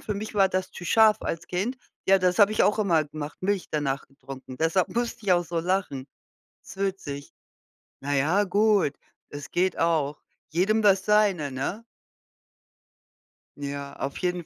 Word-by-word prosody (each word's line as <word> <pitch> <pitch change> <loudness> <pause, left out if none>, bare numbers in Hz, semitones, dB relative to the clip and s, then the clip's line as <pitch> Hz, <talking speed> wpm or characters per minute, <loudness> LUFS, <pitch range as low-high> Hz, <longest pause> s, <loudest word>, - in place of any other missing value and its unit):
für 210 - -4
mich 215 +2 -6
war 195 -2 +4
das 185 0 -2
zu 175 - -9
scharf 220 +2 +5
als 165 0 -4
Kind. 205 +9 -2 0.3
Ja, 195 0 +6
das 180 +2 +1
habe 205 +1 +6
ich - - +2
auch 210 +2 +2
immer 170 -7 +3
gemacht, 145 0 -7
Milch 200 -1 0
danach 140 -3 -2
getrunken. 135 -1 -11
Deshalb 165 +3 +2
musste 235 -2 -2
ich 185 - +5
auch 175 0 +2
so 170 0 -3
lachen. 175 -7 -2 0.6
Ist - - -12
witzig. 180 -8 -4 0.7
Na 145 +1 -2
ja, 165 +9 +3
gut. 200 -5 +2 0.4
Es 145 -1 -8
geht 185 0 0
auch. 155 -4 0 0.3
Jedem 200 +7 +2
das 195 -1 +4
seine, 200 -9 +2
ne? 145 - -4 1.7
Ja, 140 0 -5
auf 135 0 -4
jeden 180 -2 -2
180 Hz, 160 wpm, -26 LUFS, 145-200 Hz, 1.7 s, Ja